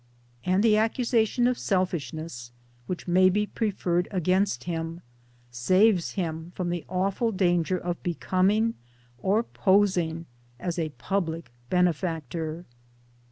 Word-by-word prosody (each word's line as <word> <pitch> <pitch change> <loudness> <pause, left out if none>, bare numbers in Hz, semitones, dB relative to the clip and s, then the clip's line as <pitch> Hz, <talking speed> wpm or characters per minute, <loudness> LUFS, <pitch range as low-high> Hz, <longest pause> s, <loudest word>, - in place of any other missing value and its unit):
And 185 +6 +2
the 215 -2 +5
accusation 230 +1 +2
of 250 0 +1
selfishness, 160 - -2 0.4
which 180 - -5
may 185 +1 +5
be 210 +3 +1
preferred 185 -5 -1
against 185 -6 +1
him, 165 0 -4 0.5
saves 185 - +3
him 165 -3 -3
from 175 -2 -2
the 175 -2 -3
awful 195 +5 0
danger 180 -2 +1
of 175 0 -4
becoming, 190 +6 +1 0.5
or 205 +4 +2
posing 185 -6 +2 0.3
as, 175 -1 -3
a 160 -1 -1
public 165 +2 -3 0.2
benefactor. 165 -2 -1
180 Hz, 115 wpm, -27 LUFS, 165-200 Hz, 0.5 s, the